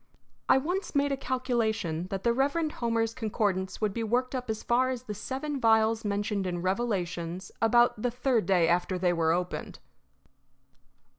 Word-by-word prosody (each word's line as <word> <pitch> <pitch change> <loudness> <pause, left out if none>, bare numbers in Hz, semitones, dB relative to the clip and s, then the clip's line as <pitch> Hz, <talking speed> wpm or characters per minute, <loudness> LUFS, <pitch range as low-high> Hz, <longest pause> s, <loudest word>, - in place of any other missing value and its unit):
I - - +7
once 350 +6 -2
made 285 0 +2
a - - +2
calculation 225 -10 -1
that 195 -1 -4
the 235 - +3
Reverend 285 +5 +1
Homer's 230 -3 -1
concordance 205 -5 -1
would 210 -2 +1
be 230 - -3
worked 245 +4 0
up 250 -2 -4
as 220 -1 -3
far 250 +2 +2
as 255 -2 -4
the 210 - -5
Seven 275 +7 -4
Vials 225 -1 +3
mentioned 205 -1 -1
in 175 -1 -3
Revelations 185 -4 -2
about 240 -1 +4
the 245 - +1
third 245 -1 0
day 180 -4 +4
after 180 +2 +1
they 180 -1 +2
were 165 -1 +2
opened. 180 +1 -3
225 Hz, 165 wpm, -28 LUFS, 190-250 Hz, -, I